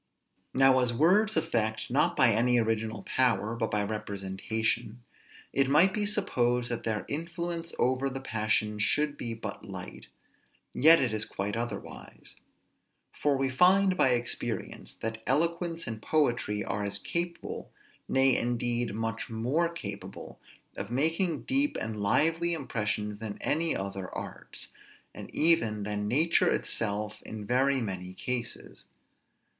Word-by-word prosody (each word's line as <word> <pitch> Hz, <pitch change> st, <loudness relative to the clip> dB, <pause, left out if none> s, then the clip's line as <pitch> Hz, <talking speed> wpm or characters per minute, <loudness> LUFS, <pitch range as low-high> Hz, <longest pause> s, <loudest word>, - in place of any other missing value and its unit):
Now, 135 Hz, 0 st, +6 dB
as 125 Hz, -2 st, +2 dB
words 185 Hz, -, +3 dB
affect, 115 Hz, -10 st, -1 dB
not 140 Hz, +4 st, +2 dB
by 125 Hz, -3 st, +6 dB
any 120 Hz, +3 st, +3 dB
original 110 Hz, -2 st, -1 dB
power, 120 Hz, -3 st, +1 dB
but 110 Hz, -1 st, -1 dB
by 105 Hz, 0 st, 0 dB
representation, 105 Hz, +2 st, -2 dB, 0.5 s
it 135 Hz, -1 st, +2 dB
might 170 Hz, +7 st, +5 dB
be 210 Hz, 0 st, 0 dB
supposed, 125 Hz, -, 0 dB
that 120 Hz, -, -3 dB
their 110 Hz, -2 st, -1 dB
influence 170 Hz, +2 st, -3 dB
over 130 Hz, +2 st, +1 dB
the 135 Hz, 0 st, -5 dB
passions 105 Hz, -3 st, 0 dB
should 150 Hz, +6 st, +2 dB
be 115 Hz, -4 st, -4 dB
but 110 Hz, -, -7 dB
light; -, -, -8 dB, 0.7 s
yet 160 Hz, +4 st, +7 dB
it 120 Hz, -4 st, 0 dB
is 110 Hz, 0 st, +1 dB
quite 100 Hz, 0 st, -4 dB
otherwise; 120 Hz, +1 st, -6 dB, 0.8 s
for 145 Hz, -2 st, +1 dB
we 135 Hz, 0 st, 0 dB
find 185 Hz, +6 st, +5 dB
by 135 Hz, -, +4 dB
experience, 120 Hz, 0 st, -2 dB
that 110 Hz, 0 st, -5 dB
eloquence 165 Hz, +3 st, 0 dB
and 110 Hz, -1 st, -5 dB
poetry 120 Hz, -9 st, +1 dB
are 100 Hz, +1 st, -2 dB
as 100 Hz, 0 st, -1 dB
capable, 170 Hz, -, -4 dB, 0.4 s
nay 135 Hz, -1 st, +4 dB
indeed 120 Hz, -2 st, -1 dB
much 115 Hz, 0 st, -3 dB
more 125 Hz, +10 st, 0 dB
capable, 100 Hz, -12 st, -8 dB, 0.4 s
of 100 Hz, -, -5 dB
making 160 Hz, +6 st, +1 dB
deep 275 Hz, +2 st, +1 dB
and 110 Hz, -1 st, -4 dB
lively 165 Hz, +11 st, +2 dB
impressions 105 Hz, -7 st, -2 dB
than 110 Hz, -2 st, -5 dB
any 165 Hz, +2 st, +1 dB
other 95 Hz, -1 st, -4 dB
arts, -, -, -7 dB, 0.4 s
and -, -, -9 dB
even 115 Hz, -11 st, +2 dB
than 105 Hz, 0 st, -2 dB
nature 155 Hz, +9 st, +3 dB
itself 105 Hz, -1 st, -1 dB
in 110 Hz, -1 st, -7 dB
very 130 Hz, +4 st, +2 dB
many 95 Hz, -4 st, -5 dB
cases. 120 Hz, +1 st, -5 dB
120 Hz, 135 wpm, -29 LUFS, 110-155 Hz, 0.8 s, yet